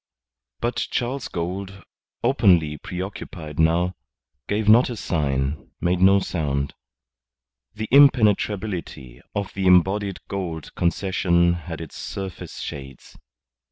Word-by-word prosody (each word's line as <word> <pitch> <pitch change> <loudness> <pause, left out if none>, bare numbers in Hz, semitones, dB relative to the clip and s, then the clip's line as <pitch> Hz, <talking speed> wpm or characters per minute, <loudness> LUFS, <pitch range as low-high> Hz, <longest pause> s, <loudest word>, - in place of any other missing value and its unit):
But 120 +1 -1
Charles 130 +3 -2
Gould, 95 +3 -5 0.4
openly 90 - +3
preoccupied 90 -4 -7
now, 85 +3 +3 0.5
gave 105 +1 -1
not 115 +4 +6
a 120 - -4
sign, 70 -6 -2
made 90 +1 0
no 95 +1 +7
sound. 70 -7 -2 1.0
The 110 0 -4
impenetrability 105 - +3
of 100 -2 -3
the 95 -1 -1
embodied 95 +2 +3
Gould 85 -5 -5
Concession 85 -1 +2
had 85 -1 -6
its 80 - -9
surface 95 -2 -6
shades. 65 -2 -8
90 Hz, 105 wpm, -23 LUFS, 80-100 Hz, 1.0 s, no